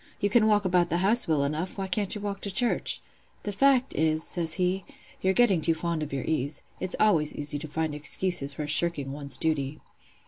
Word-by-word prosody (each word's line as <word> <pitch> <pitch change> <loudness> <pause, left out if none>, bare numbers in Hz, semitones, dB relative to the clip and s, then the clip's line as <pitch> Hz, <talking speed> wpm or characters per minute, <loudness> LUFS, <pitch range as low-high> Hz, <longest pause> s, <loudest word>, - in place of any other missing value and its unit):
You 205 - 0
can 220 -1 +4
walk 210 -2 +2
about 180 -2 +2
the 170 - 0
house 235 +4 +4
well 155 -3 +1
enough; 155 +7 -3
why 195 - -3
can't 195 +3 -1
you 210 - -6
walk 200 -1 -5
to 200 - +1
church? 235 +5 +1 0.4
The 205 - -3
fact 265 +4 +2
is,' 155 0 +1
says 165 -2 -1
he, 185 +1 -1 0.4
'you're 190 0 +1
getting 210 -9 +3
too 165 +1 +1
fond 170 -1 -3
of 150 - -5
your 135 -2 -3
ease. 145 -1 -2 0.2
It's 185 0 -4
always 165 -9 +2
easy 145 0 -2
to 155 - -7
find 160 0 -3
excuses 150 -1 +3
for 150 - -4
shirking 150 -2 +1
one's 140 -2 -3
duty. 150 -2 -1
170 Hz, 210 wpm, -26 LUFS, 150-200 Hz, 0.4 s, can